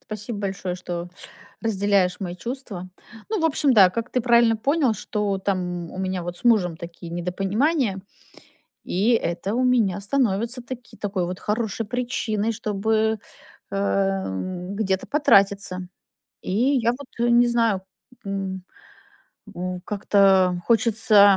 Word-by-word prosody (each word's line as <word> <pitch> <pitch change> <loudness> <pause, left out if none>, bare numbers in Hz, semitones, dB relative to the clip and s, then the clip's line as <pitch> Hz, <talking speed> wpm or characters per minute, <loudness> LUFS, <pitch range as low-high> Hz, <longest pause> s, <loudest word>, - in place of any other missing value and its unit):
спасибо 215 -3 -6
большое, 190 -2 -3
что 175 -1 -5 0.5
разделяешь 200 -4 +1
мои 175 -2 -4
чувства. 220 -5 -6 0.4
Ну, 430 -5 -1
в - - 0
общем, 290 -3 +3
да, 200 -6 +8
как 230 +5 -4
ты 250 - +1
правильно 235 -1 +4
понял, 275 0 +1
что 205 -1 -2
там 180 -3 -2
у 185 - -8
меня 185 -1 -2
вот 175 0 -5
с - - -14
мужем 190 -9 +3
такие 170 0 -9
недопонимания, 195 - 0 0.8
и 200 +6 +1
это 190 -1 -1
у 255 - +1
меня 225 -7 +2
становится 235 +1 0
таки 245 0 -9
такой 195 -3 -2
вот 180 +1 -5
хорошей 220 0 -2
причиной, 230 -2 -1
чтобы, 220 +1 0 0.5
эм, 195 - -1
где-то 190 -3 -1
потратиться. 200 -9 +3 0.5
И - - -4 0.2
я 235 -1 +2
вот, 270 +2 -9
э, 240 - +2
не 240 0 +6
знаю, 230 -5 +1 0.4
м, 195 -1 -3 0.9
м, 180 0 -4
как-то 195 -3 +3
хочется 215 -3 +5
200 Hz, 130 wpm, -23 LUFS, 185-235 Hz, 0.9 s, да